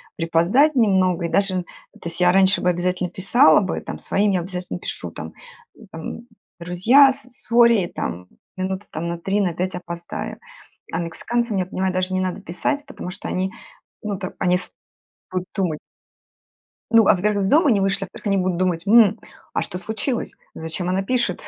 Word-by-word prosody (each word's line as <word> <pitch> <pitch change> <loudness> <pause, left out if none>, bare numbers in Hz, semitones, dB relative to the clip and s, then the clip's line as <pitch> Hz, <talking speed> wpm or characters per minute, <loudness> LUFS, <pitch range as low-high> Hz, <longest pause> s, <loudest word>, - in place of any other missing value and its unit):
припоздать 175 - +3
немного 190 -7 +2
и - - -2
даже, 190 -1 +1
то - - -31 0.4
есть 170 +1 +1
я 180 0 +6
раньше 190 +1 +4
бы 180 - +2
обязательно 180 +1 -1
писала 185 -2 +5
бы, 190 - -3
там - - -6
своим 205 +1 +1
я 180 - +1
обязательно 180 0 -5
пишу - - -6
там, - - -8 0.5
э, - - -16
там: 165 +6 -6 0.4
"друзья, 220 +12 +5
с 265 - -10 0.2
сорри, 235 -5 +5
там 90 - -5 0.3
минуты 190 +1 -3
на 170 +2 -3
3 195 +4 0
на 175 -4 0
5 185 +2 -2
опоздаю". 170 -1 -6 0.5
А - - -2
мексиканцам, 230 +7 -2
я 185 - 0
понимаю, 185 +1 -2
даже 185 0 0
не 185 - +1
надо 185 -1 -3
писать, 285 - -2
потому 275 -9 -8
что 180 - -7
они, 190 +1 -1 0.5
ну 205 -3 -3
там, 185 - -5
они 180 -1 +3
с 180 - -6 0.6
будут 185 0 -3
думать. 180 -7 -1 1.1
Ну, 225 -2 +6
а - - +6
во-первых, 200 +2 0
из 190 - +1
дома 300 - +4
не 210 -4 +3
вышли, 195 0 0
а - - -7
во-вторых, - - -14
они 200 -1 +2
будут 185 -2 0
думать: 180 -2 0
"м, 220 0 +6 0.4
а - - +1
что 180 - -4
случилось? 220 +5 -3 0.2
Зачем 160 +3 -4
она 185 +1 +1
пишет, 235 -3 0
185 Hz, 185 wpm, -22 LUFS, 180-210 Hz, 1.1 s, я